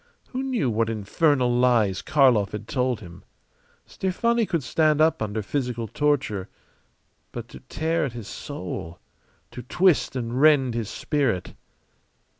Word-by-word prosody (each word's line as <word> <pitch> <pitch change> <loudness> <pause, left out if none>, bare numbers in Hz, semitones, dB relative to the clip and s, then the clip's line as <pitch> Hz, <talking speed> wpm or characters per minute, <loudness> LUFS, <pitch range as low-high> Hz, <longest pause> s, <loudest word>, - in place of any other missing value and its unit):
Who 255 - -3
knew 250 - 0
what 115 +1 0
infernal 120 +4 +1
lies 120 -6 +3
Karlov 130 -10 +3
had 105 - -6
told 125 -5 -1
him? 90 -1 -12 0.6
Stefani 230 +4 0
could 170 -6 -1
stand 155 +2 +2
up 160 -2 +3
under 110 0 -2
physical 120 -2 -3
torture; 130 -8 -1 0.8
but 120 -1 -7
to - - -11
tear 165 +1 0
at 130 - -5
his 115 -4 -8
soul, 80 +2 -6 0.5
to - - -7
twist 170 +5 +2
and 125 +1 -2
rend 145 -5 +5
his 115 -3 -3
spirit! 130 - -1
125 Hz, 135 wpm, -24 LUFS, 110-155 Hz, 0.8 s, rend